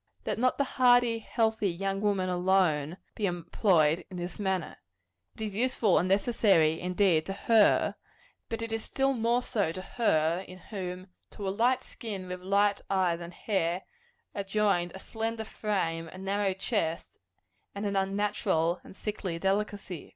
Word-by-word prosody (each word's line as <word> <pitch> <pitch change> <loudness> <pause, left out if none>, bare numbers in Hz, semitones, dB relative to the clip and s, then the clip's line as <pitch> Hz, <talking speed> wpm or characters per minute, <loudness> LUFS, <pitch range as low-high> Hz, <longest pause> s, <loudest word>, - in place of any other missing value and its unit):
Let - - -2
not 255 +1 +2
the 280 - +3
hardy, 245 -3 +4
healthy 220 -2 0
young 195 +3 -2
woman 200 -3 +1
alone, 180 -4 +1 0.2
be 210 - -1
employed 175 -2 +2
in 185 - -7
this 175 +3 -5
manner. 190 -2 -2 0.6
It - - -11
is 210 -2 -4
useful 230 -4 +2
and 180 - 0
necessary, 195 -6 +3
indeed, 180 -3 +2
to 195 - -2
her; 220 +1 +4 0.6
but 230 0 -3
it 230 0 -4
is 225 - -2
still 270 0 0
more 240 0 +1
so 200 -10 0
to 185 - -6 0.2
her 170 -4 +2
in 185 - -10
whom, 185 -1 -6 0.2
to 200 - -6
a - - +1
light 250 +4 +2
skin 200 -5 -7
with 180 0 -6
light 200 +2 +2
eyes 185 -3 +1
and 170 0 -7
hair, 180 -2 -1 0.5
are 200 - -2
joined 195 -3 +1
a - - -7
slender 225 +2 -3
frame, 170 -7 -2
a 185 - -11
narrow 195 0 0
chest, 175 -5 -2 0.6
and 200 +1 -3
an 200 -1 -1
unnatural 195 -3 0
and - - -13
sickly 200 -5 -4
delicacy. 195 -2 -2
195 Hz, 160 wpm, -29 LUFS, 180-215 Hz, 0.6 s, hardy